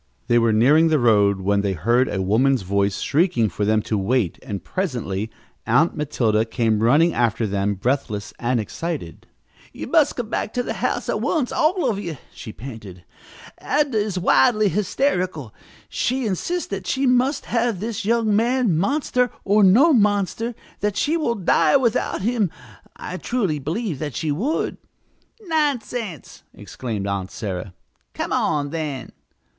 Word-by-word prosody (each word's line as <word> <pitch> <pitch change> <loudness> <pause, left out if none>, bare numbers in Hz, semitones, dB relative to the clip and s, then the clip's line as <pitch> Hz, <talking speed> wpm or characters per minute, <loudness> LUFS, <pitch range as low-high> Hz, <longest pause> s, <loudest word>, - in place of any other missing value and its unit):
They 120 0 +3
were 115 -1 +3
nearing 140 +9 +5
the 160 -1 +3
road 105 -6 +3
when 100 +1 +1
they 100 -1 -1
heard 120 - +2
a 95 - -2
woman's 120 +4 +2
voice 100 +1 0
shrieking 150 - +2
for 100 +4 -2
them 110 0 +2
to 105 - -1
wait, 105 -2 0
and 100 -8 -6
presently 115 - -3 0.4
Aunt 135 +9 +3
Matilda 115 -7 +1
came 115 -2 0
running 150 +9 +4
after 115 -1 +1
them, 100 0 -1
breathless 110 -1 -2
and 120 0 0
excited. 165 - -5 0.4
"You - - -7
must 315 -3 +3
come 240 -3 -4
back 215 - -3
to 245 - 0
the - - -3
house - - -2
at - - -1
once, 295 -7 0
all 345 +4 +1
of 205 -3 -1
you," 170 -7 -5 0.2
she 110 - -9
panted. 105 -8 -10 0.6
"Adnah 290 -3 0
is 210 -3 0
wildly 205 - +3
hysterical. 185 - -1 0.3
She 255 0 -1
insists 335 - -2
that 195 -2 -5
she 275 +1 0
must 255 +3 +2
have 235 -4 0
this 220 +1 -4
young 225 0 +2
man, 235 -3 +2
monster 250 - +1
or 205 +1 +3
no 250 - +6
monster 210 +1 +1 0.2
that 205 -1 -1
she 305 +3 +1
will 300 -8 0
die 200 +7 +3
without 235 -7 0
him. 225 -4 +1 0.5
I 180 - -6
truly 195 -10 -1
believe 165 - -3
that 145 -5 -4
she 155 - -1
would!" 240 - -1 0.7
"Nonsense!" 250 - -2
exclaimed 110 -6 -5
Aunt 100 -2 -3
Sarah. 95 -3 -5 0.4
"Come - - -3
on, 145 -1 0
then!" 150 -5 -4
160 Hz, 155 wpm, -22 LUFS, -, 0.7 s, no